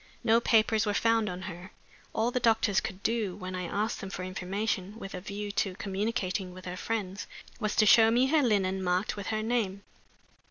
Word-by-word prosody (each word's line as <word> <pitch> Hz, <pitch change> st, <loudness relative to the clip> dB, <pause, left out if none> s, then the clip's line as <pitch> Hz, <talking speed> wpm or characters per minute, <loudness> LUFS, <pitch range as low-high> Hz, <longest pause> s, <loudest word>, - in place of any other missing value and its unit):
No 225 Hz, 0 st, +5 dB
papers 220 Hz, -1 st, +3 dB
were 205 Hz, -, 0 dB
found 225 Hz, -1 st, +2 dB
on 180 Hz, +1 st, -6 dB
her. 175 Hz, +1 st, -8 dB, 0.4 s
All 225 Hz, +2 st, 0 dB
the 250 Hz, -, 0 dB
doctors 225 Hz, -4 st, +3 dB
could 190 Hz, +1 st, -6 dB
do, 220 Hz, -5 st, 0 dB
when 185 Hz, -2 st, -6 dB
I 180 Hz, -1 st, -3 dB
asked 210 Hz, +6 st, -2 dB
them 195 Hz, -, -6 dB
for 185 Hz, -1 st, -5 dB
information 195 Hz, +2 st, -3 dB
with 195 Hz, -4 st, -8 dB
a 180 Hz, -, -5 dB
view 205 Hz, +1 st, -5 dB
to 195 Hz, -2 st, -1 dB
communicating 190 Hz, -2 st, -2 dB
with 185 Hz, -, -11 dB
her 180 Hz, 0 st, -4 dB
friends, 200 Hz, -1 st, -3 dB, 0.3 s
was 215 Hz, -3 st, -1 dB
to 215 Hz, -, +5 dB
show 225 Hz, +2 st, +7 dB
me 240 Hz, +3 st, +4 dB
her 300 Hz, +3 st, +3 dB
linen 190 Hz, -6 st, +1 dB
marked 180 Hz, +2 st, 0 dB
with 200 Hz, -1 st, -6 dB
her, 215 Hz, -1 st, -1 dB
name. 215 Hz, -4 st, -1 dB
205 Hz, 200 wpm, -29 LUFS, 185-225 Hz, 0.4 s, show